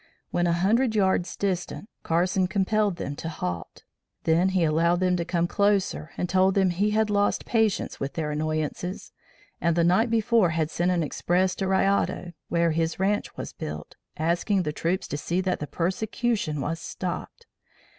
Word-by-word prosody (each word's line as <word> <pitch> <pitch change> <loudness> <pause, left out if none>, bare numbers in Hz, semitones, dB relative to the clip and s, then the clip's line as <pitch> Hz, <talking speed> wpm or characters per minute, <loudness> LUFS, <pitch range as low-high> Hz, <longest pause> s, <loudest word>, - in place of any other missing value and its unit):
When 175 0 +1
a 170 - +2
hundred 220 +7 +2
yards 190 -3 +1
distant, 190 +1 -2
Carson 180 +3 +1
compelled 200 +1 +1
them 145 -4 -5
to 165 - -4
halt. 90 - -5 0.4
Then 170 +3 +3
he 185 -2 +1
allowed 165 +2 +2
them 180 -1 +2
to 170 - -1
come 170 0 0
closer 200 -4 +1
and 180 - -1
told 190 +1 +3
them 190 -2 +3
he 200 +4 +1
had 215 0 +1
lost 205 0 +1
patience 220 -4 0
with 135 0 -3
their 155 -2 -2
annoyances, 155 +4 -3 0.5
and 170 -1 +2
the 170 - +3
night 185 +8 +3
before 225 -3 +3
had 160 -1 0
sent 175 +1 0
an 175 -2 +1
express 180 +5 +1
to 195 - -1
Rayado 190 -2 +1 0.2
(where 170 -1 +2
his 160 +1 -1
ranche 205 +2 0
was - - -6
built), 75 0 -7 0.2
asking 175 +4 +1
the 150 -2 -2
troops 175 +4 -1
to 145 - -3
see 170 +4 -1
that 185 0 0
the 150 - -4
persecution 190 - -1
was 165 +3 -2
stopped. 180 - -5
180 Hz, 175 wpm, -26 LUFS, 165-200 Hz, 0.5 s, Then